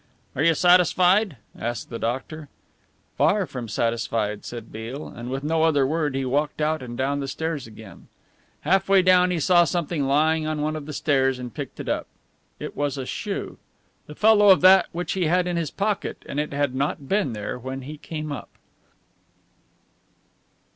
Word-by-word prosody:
"Are 130 Hz, -, -1 dB
you 165 Hz, +1 st, +4 dB
satisfied?" 180 Hz, -, +4 dB, 0.2 s
asked 120 Hz, +2 st, -5 dB
the 115 Hz, -, -5 dB
doctor. 135 Hz, +5 st, -4 dB, 0.7 s
"Far 200 Hz, -1 st, +3 dB
from 125 Hz, -7 st, -7 dB
satisfied," 115 Hz, -1 st, -1 dB
said 115 Hz, -2 st, -8 dB
Beale, 115 Hz, +7 st, -6 dB
and 120 Hz, +1 st, -8 dB
with 135 Hz, +2 st, -4 dB
no 160 Hz, +2 st, +1 dB
other 150 Hz, -4 st, +3 dB
word 150 Hz, -1 st, -1 dB
he 135 Hz, 0 st, -1 dB
walked 145 Hz, +5 st, -1 dB
out 155 Hz, +1 st, 0 dB
and 120 Hz, -1 st, -7 dB
down 140 Hz, +2 st, 0 dB
the 140 Hz, -, -3 dB
stairs 160 Hz, -3 st, -3 dB
again. 110 Hz, -2 st, -13 dB, 0.5 s
Half 195 Hz, 0 st, +1 dB
way 195 Hz, -1 st, +5 dB
down 180 Hz, 0 st, +5 dB
he 180 Hz, -2 st, -1 dB
saw 175 Hz, +2 st, +5 dB
something 170 Hz, -4 st, -1 dB
lying 155 Hz, +3 st, +2 dB
on 155 Hz, -1 st, -2 dB
one 155 Hz, +1 st, -1 dB
of 150 Hz, -2 st, -7 dB
the 150 Hz, -, -6 dB
stairs 135 Hz, -3 st, +1 dB
and 125 Hz, -2 st, -7 dB
picked -, -, -7 dB
it -, -, -6 dB
up. -, -, -2 dB, 0.5 s
It -, -, -6 dB
was 145 Hz, -1 st, -2 dB
a 130 Hz, -, -4 dB
shoe, -, -, -5 dB, 0.5 s
the 150 Hz, -, -10 dB
fellow 210 Hz, 0 st, +5 dB
of 190 Hz, -, +7 dB
that 185 Hz, -1 st, +7 dB
which 175 Hz, -1 st, -4 dB
he 185 Hz, -2 st, 0 dB
had 180 Hz, +3 st, +2 dB
in 180 Hz, -1 st, -2 dB
his 165 Hz, -3 st, -1 dB
pocket, 205 Hz, 0 st, -3 dB
and 145 Hz, -, -3 dB
it 150 Hz, -, -2 dB
had 140 Hz, -2 st, 0 dB
not 140 Hz, +1 st, -2 dB
been 195 Hz, -, 0 dB
there 105 Hz, +3 st, -5 dB
when 130 Hz, +2 st, -6 dB
he 150 Hz, +3 st, -8 dB
came 155 Hz, -1 st, -6 dB
up. 145 Hz, -, -6 dB
150 Hz, 185 wpm, -24 LUFS, 130-175 Hz, 0.7 s, of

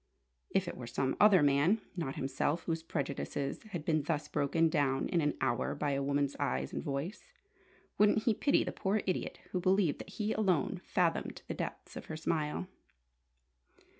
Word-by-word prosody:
If -, -, +1 dB
it -, -, -4 dB
were 120 Hz, -, -7 dB
some 130 Hz, +2 st, -1 dB
other 200 Hz, -6 st, +7 dB
man, 145 Hz, +9 st, +4 dB, 0.2 s
not 150 Hz, -7 st, -3 dB
himself, 140 Hz, +4 st, -1 dB
whose 165 Hz, -1 st, -2 dB
prejudices 140 Hz, -3 st, -3 dB
had 175 Hz, -7 st, -5 dB
been 155 Hz, -1 st, +2 dB
thus 150 Hz, +1 st, -2 dB
broken 150 Hz, +3 st, +2 dB
down 140 Hz, -4 st, +1 dB
in 175 Hz, -3 st, +2 dB
an 150 Hz, -1 st, 0 dB
hour 120 Hz, -3 st, 0 dB
by 145 Hz, -1 st, -1 dB
a 140 Hz, 0 st, 0 dB
woman's 140 Hz, 0 st, 0 dB
eyes 65 Hz, +1 st, -1 dB
and -, -, -2 dB
voice, 145 Hz, +8 st, -4 dB, 0.8 s
wouldn't 210 Hz, +1 st, +5 dB
he 230 Hz, -, +3 dB
pity 280 Hz, +7 st, +3 dB
the -, -, -3 dB
poor 200 Hz, +1 st, 0 dB
idiot 185 Hz, -, -2 dB
who 185 Hz, -, 0 dB
believed 185 Hz, -3 st, +2 dB
that -, -, -8 dB
he 215 Hz, +1 st, -2 dB
alone 185 Hz, -9 st, +1 dB
fathomed -, -, 0 dB
the -, -, -3 dB
depths -, -, -6 dB
of -, -, -7 dB
her 160 Hz, -, -5 dB
smile? 155 Hz, +1 st, -1 dB
155 Hz, 175 wpm, -33 LUFS, 140-185 Hz, 0.8 s, other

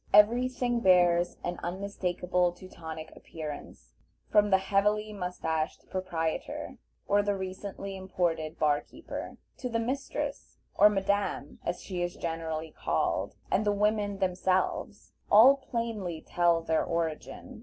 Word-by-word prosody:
Every 235 Hz, +5 st, +6 dB
thing 245 Hz, -1 st, 0 dB
bears 175 Hz, -3 st, +4 dB
an 175 Hz, 0 st, -3 dB
unmistakable 180 Hz, -1 st, -1 dB
Teutonic 160 Hz, -3 st, -9 dB
appearance; 150 Hz, -, -8 dB, 0.4 s
from 210 Hz, -1 st, +5 dB
the 190 Hz, -, +6 dB
heavily 210 Hz, +2 st, +1 dB
mustached 160 Hz, -5 st, -3 dB
proprietor, 170 Hz, -4 st, -3 dB, 0.3 s
or 205 Hz, 0 st, +4 dB
the 205 Hz, 0 st, 0 dB
recently 195 Hz, +1 st, -5 dB
imported 175 Hz, -4 st, -1 dB
bar 150 Hz, -1 st, +3 dB
keeper, -, -, -8 dB, 0.2 s
to 250 Hz, -, -4 dB
the 230 Hz, -, 0 dB
mistress, 260 Hz, +4 st, -3 dB, 0.2 s
or 210 Hz, -, +7 dB
madame 200 Hz, -7 st, -1 dB
as 175 Hz, +1 st, -3 dB
she 180 Hz, -3 st, -4 dB
is 175 Hz, 0 st, -2 dB
generally 160 Hz, -1 st, -3 dB
called, -, -, -1 dB, 0.2 s
and 195 Hz, -, +3 dB
the 210 Hz, -, +2 dB
women 205 Hz, 0 st, +1 dB
themselves, 185 Hz, 0 st, 0 dB, 0.2 s
all 250 Hz, +7 st, +8 dB
plainly 230 Hz, -10 st, -3 dB
tell 170 Hz, -1 st, +3 dB
their 160 Hz, -1 st, +1 dB
origin. 165 Hz, -2 st, -3 dB
185 Hz, 125 wpm, -29 LUFS, 170-205 Hz, 0.4 s, all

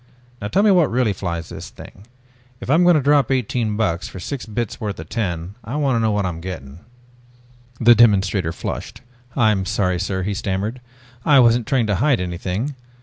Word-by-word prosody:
Now 100 Hz, -, -3 dB
tell 195 Hz, -, +2 dB
me 210 Hz, -, +5 dB
what 175 Hz, -5 st, +4 dB
really 120 Hz, -3 st, +1 dB
flies 85 Hz, -3 st, -4 dB
the -, -, -8 dB
thing. 100 Hz, +4 st, -12 dB, 0.5 s
If -, -, -4 dB
I'm 160 Hz, +4 st, +5 dB
going 175 Hz, -1 st, +6 dB
to 150 Hz, -, +2 dB
drop 145 Hz, -3 st, +3 dB
eighteen 120 Hz, -4 st, -1 dB
bucks 90 Hz, -6 st, -1 dB
for 95 Hz, -, -9 dB
six 125 Hz, +8 st, -5 dB
bits 110 Hz, 0 st, -4 dB
worth 105 Hz, -4 st, -4 dB
of 80 Hz, -, -9 dB
tin, 90 Hz, -5 st, -3 dB
I 115 Hz, +6 st, -6 dB
want 140 Hz, -4 st, +1 dB
to -, -, +1 dB
know 110 Hz, -1 st, +2 dB
what 105 Hz, -2 st, 0 dB
I'm 85 Hz, -2 st, -4 dB
getting." 85 Hz, -5 st, -8 dB, 1.0 s
The 120 Hz, 0 st, +7 dB
demonstrator 100 Hz, -6 st, +3 dB
flushed. 85 Hz, -, -6 dB, 0.3 s
"I'm 110 Hz, -6 st, +2 dB
sorry, 90 Hz, -2 st, 0 dB
sir," 95 Hz, 0 st, -2 dB
he 100 Hz, +2 st, -2 dB
stammered. 100 Hz, +5 st, -3 dB, 0.4 s
"I 145 Hz, -3 st, +5 dB
wasn't 120 Hz, -2 st, +4 dB
trying 130 Hz, -4 st, +2 dB
to 105 Hz, -3 st, 0 dB
hide 130 Hz, +3 st, +2 dB
anything. 90 Hz, +9 st, -3 dB
105 Hz, 195 wpm, -21 LUFS, 95-125 Hz, 1.0 s, The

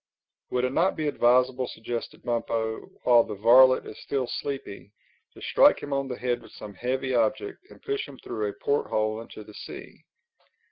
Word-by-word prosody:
"Would 125 Hz, 0 st, 0 dB
it 130 Hz, -, -2 dB
not 180 Hz, +6 st, +2 dB
be, 155 Hz, -1 st, -2 dB
advisable," 125 Hz, -1 st, +3 dB
suggested 115 Hz, +1 st, -6 dB
Bumpo, 115 Hz, -2 st, -2 dB, 0.2 s
"while 120 Hz, -2 st, +6 dB
the -, -, -6 dB
varlet 130 Hz, +5 st, +6 dB
is -, -, -10 dB
still 135 Hz, -2 st, -1 dB
sleepy, 130 Hz, -6 st, -6 dB, 0.4 s
to -, -, -13 dB
strike -, -, +5 dB
him 145 Hz, -, -4 dB
on 140 Hz, 0 st, -1 dB
the 125 Hz, -2 st, -5 dB
head 125 Hz, -1 st, -1 dB
with -, -, -16 dB
some 105 Hz, -, -9 dB
heavy 130 Hz, +5 st, -2 dB
object 120 Hz, -, 0 dB
and -, -, -17 dB
push 415 Hz, -1 st, -2 dB
him 135 Hz, -, -12 dB
through 105 Hz, -4 st, -3 dB
a -, -, -6 dB
port 140 Hz, +7 st, -1 dB
hole 110 Hz, +1 st, -1 dB
into 110 Hz, -1 st, -10 dB
the 105 Hz, -, -14 dB
sea?" -, -, -10 dB
125 Hz, 185 wpm, -26 LUFS, 110-135 Hz, 0.4 s, while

